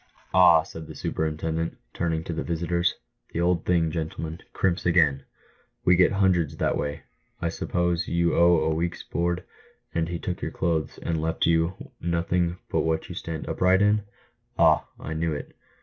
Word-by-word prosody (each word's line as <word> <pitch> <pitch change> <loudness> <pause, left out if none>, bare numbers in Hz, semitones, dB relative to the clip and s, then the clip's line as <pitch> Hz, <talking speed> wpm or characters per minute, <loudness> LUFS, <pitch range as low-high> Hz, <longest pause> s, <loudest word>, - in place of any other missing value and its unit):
"Ah," 85 -3 +7
said 80 0 -9
the - - -9
superintendent, 80 +1 -2 0.2
turning 80 -2 -1
to 85 - -4
the 80 - -2
visitors, 85 +1 0 0.4
"the - - -2
old 85 -1 +1
thing, 85 -3 +2
gentlemen, 80 0 -4
' - - -40
crimps' 90 -3 0
again! 80 -6 +3 0.6
"We 90 - +6
get 90 +3 +4
hundreds 95 -6 +2
that - - +1
way. 75 +1 -3 0.4
I 85 - -1
suppose 85 0 -1
you 85 0 +1
owed 85 -2 +4
a - - +2
week's 85 +2 -2
board, 85 +1 -1 0.5
and 85 0 0
he 85 - -2
took 90 +1 -4
your - - -2
clothes, 80 -3 -1
and 80 -2 -1
left 80 0 0
you 85 +2 0
nothing 85 +1 0
but - - +2
what 80 0 -1
you - - -5
stand 80 -2 -5
upright 95 +2 +3
in? 105 +1 +3 0.6
Ah! - - +4
I 80 - -5
knew^it 80 -2 -2
85 Hz, 170 wpm, -26 LUFS, 80-85 Hz, 0.6 s, Ah